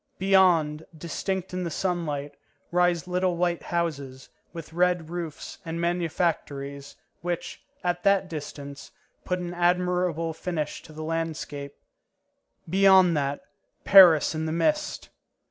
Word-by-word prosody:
Beyond, 175 -5 +3
distinct 185 +3 -4
in 185 0 -2
the 170 - -2
sunlight, 155 -4 -2 0.4
rise 175 -1 +2
little 180 -1 0
white 175 -1 0
houses, 140 -7 -3 0.2
with 165 -2 -9
red 175 -2 +1
roofs, 170 -3 -6
and 165 0 -5
manufactories, 160 -5 -2 0.3
which, 175 0 -4 0.2
at 175 -1 -1
that 195 0 +3
distance, 145 -3 -8 0.4
put 180 - -1
an 175 -1 -5
admirable 175 -2 +1
finish 155 -2 -4
to - - -15
the 155 0 -7
landscape. 155 -3 -4 0.9
Beyond 190 -1 +5
that, 140 0 -1 0.4
Paris 180 -7 +7
in 160 0 -3
the - - -2
mist! 300 - -1
170 Hz, 120 wpm, -26 LUFS, 155-180 Hz, 0.9 s, Paris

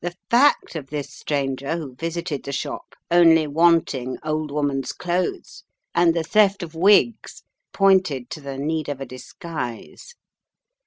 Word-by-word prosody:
The 175 0 -4 0.2
fact 250 -5 +3
of 145 -4 -5
this 145 0 -5
stranger 140 +1 -2
who 145 -6 -7
visited 165 +1 -4
the 140 - -6
shop 140 - -5 0.2
only 165 -2 +6
wanting 150 -5 +2
old 155 0 -2
woman's 145 -2 -2
clothes 180 0 -3 0.3
and 170 -1 +3
the 165 - 0
theft 200 +1 +3
of 165 -2 -8
wigs 205 +6 +2 0.3
pointed 185 -11 +2
to 155 - -6
the 140 -1 -6
need 155 +1 -2
of 145 -2 -4
a 135 - -5
disguise. 135 - -8
160 Hz, 145 wpm, -22 LUFS, 140-175 Hz, 0.3 s, only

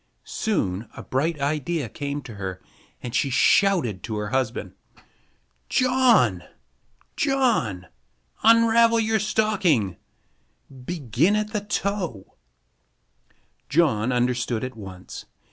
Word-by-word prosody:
Soon 110 - -2
a - - -7
bright 150 +4 -1
idea 150 +1 -1
came 140 +4 -5
to 115 - -9
her, 95 -3 -6 0.4
and 120 - -6
she 125 +3 +1
shouted 135 - +3
to 110 - -5
her 105 0 -3
husband: 130 -2 -2 1.0
"John! 250 - +3 0.7
John! 235 - +1 0.6
Unravel 230 +1 +5
your 220 0 +1
stocking! 195 - +1 0.9
Begin 160 - +1
at 210 +1 -2
the 210 - -1
toe!" 200 - -3 1.3
John 135 -7 +2
understood 120 -1 0
at 130 -1 -5
once. 95 -4 -10
145 Hz, 100 wpm, -24 LUFS, -, 1.3 s, Unravel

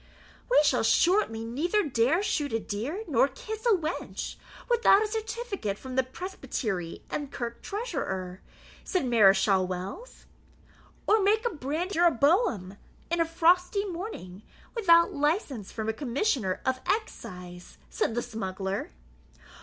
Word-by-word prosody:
"We - - +6
shall 260 -4 +3
shortly 225 - +2
neither 345 - 0
dare 265 - +2
shoot 295 - -1
a 225 - +1
deer 245 - -4
nor 270 -3 +4
kiss 435 - -6
a 450 - +6
wench, 325 0 -4 0.3
without 470 -4 +5
a - - -1
certificate 430 - -3
from 260 +2 -8
the 260 - +4
presbytery 250 - -5
and 285 -2 -3
kirk 235 -1 -5
treasurer," 200 - -4 0.4
said 365 -7 -1
Mareschal 195 -5 +4
Wells. 190 - -7 0.8
"Or 430 0 +4
make 430 +4 +2
a 475 - +1
brandy 315 +6 -3
jeroboam 305 - +2 0.3
in 340 0 +2
a - - +3
frosty 360 +5 +2
morning, 340 - -6 0.3
without 340 -7 +5
license 290 - -1
from 220 -1 -4
a 220 - 0
commissioner 250 - -1
of 260 0 +1
excise," 180 - -4
said 235 - -1
the 240 - 0
smuggler. 195 -4 -4
285 Hz, 130 wpm, -28 LUFS, -, 0.8 s, We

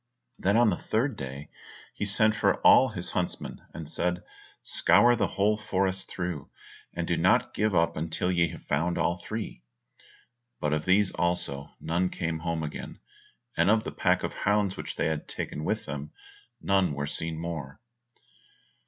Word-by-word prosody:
Then 100 +3 +2
on 120 -3 +5
the 85 - -1
third 120 +3 0
day, 70 -1 -7 0.4
he - - -3
sent 110 +2 +3
for 110 - +2
all 130 - +7
his 90 -6 -4
huntsmen, 90 - -3
and 80 -2 -7
said, 90 +3 -1 0.4
"Scour 120 +1 +5
the - - +1
whole 105 +2 +1
forest 95 -3 -1
through, 90 -6 -4 0.4
and - - -3
do - - +1
not - - +3
give 105 -2 +1
up 85 0 +2
until 80 +3 -1
ye 85 -1 +3
have 85 0 -10
found 85 +5 0
all 85 - +1
three." 105 - -6 1.0
But 75 0 0
of 75 0 -1
these 95 +1 +4
also, 80 -5 -1
none 90 +3 0
came 80 -2 -3
home 85 -1 -2
again, 75 - -6 0.6
and - - +3
of 110 0 +4
the - - -5
pack - - +1
of - - -2
hounds 105 -2 +1
which - - -6
they - - 0
had 80 -1 -2
taken 75 - -4
with - - -1
them, 75 +1 -6 0.5
none 95 -6 +2
were 70 0 -2
seen 80 +2 -3
more. 80 -4 -5
90 Hz, 170 wpm, -28 LUFS, 80-100 Hz, 1.0 s, all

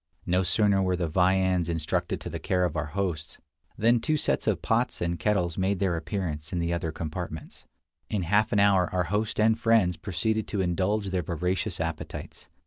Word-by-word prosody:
No 90 +1 +2
sooner 95 +2 +3
were 95 -1 +1
the 85 -1 -1
viands 90 0 +2
intrusted 80 -2 -1
to - - -5
the - - -4
care 90 -1 +1
of 85 -2 -3
our 80 - -1
hosts, 85 -6 -2 0.4
than 115 +2 +4
two 155 +6 0
sets - - -1
of - - +1
pots - - +1
and 85 -1 -2
kettles 90 -1 0
made 95 +1 +1
their 95 -2 0
appearance 80 -4 -4
in 90 - -2
the 85 0 0
other 85 -2 -2
compartments. 80 +1 -6 0.4
In 100 -4 -1
half 105 +5 +2
an 100 - +3
hour 100 -3 +4
our 90 -1 +1
host 105 +1 -1
and 110 +1 +3
friends 115 -7 +3
proceeded 110 +3 -1
to 105 - -3
indulge 95 +3 0
their 90 -1 0
voracious 90 +4 -2
appetites. 80 -1 -5
90 Hz, 190 wpm, -27 LUFS, 85-100 Hz, 0.4 s, than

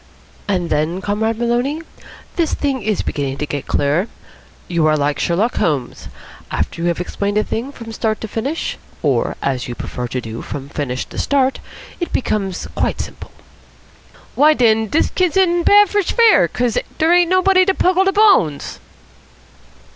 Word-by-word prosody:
"And 180 -4 -1
then, 155 +4 0
Comrade 215 +3 -1
Maloney? 240 +6 0 0.6
This 335 -3 0
thing 275 -3 -1
is 210 -1 -1
beginning 140 -2 -3
to 150 - -2
get 145 -1 -5
clearer. 150 +8 +1 0.6
You 170 -3 +1
are 155 0 +3
like 145 0 0
Sherlock 200 +8 0
Holmes. 140 -6 -1 0.4
After 170 - -3
you've 170 0 0
explained 200 +3 -2
a 215 - +3
thing 245 +5 -4
from 230 -5 -9
start 220 -1 -1
to 220 - -4
finish 260 +10 -3 0.2
or, - - +1
as 130 -3 -1
you 120 - -5
prefer 125 +1 -5
to 125 +1 -3
do, 115 -1 -7
from 140 -1 -7
finish 130 -4 -3
to - - -8
start 270 -2 +1 0.4
it 345 - -3
becomes 195 -7 -2
quite - - -1
simple." - - -7 1.0
"Why, 305 +2 +5
den 220 -3 +3
dis 295 - +1
kid's 365 -1 +1
in 350 -2 +3
bad 410 +4 +6
for 410 +2 +1
fair, 455 +4 +4
'cos 245 -3 0 0.2
der 320 +2 +3
ain't 350 -1 +4
nobody 370 0 +4
to 385 0 +1
pungle 370 +1 +2
de 390 - +3
bones." 390 - +3
220 Hz, 165 wpm, -18 LUFS, -, 1.0 s, bad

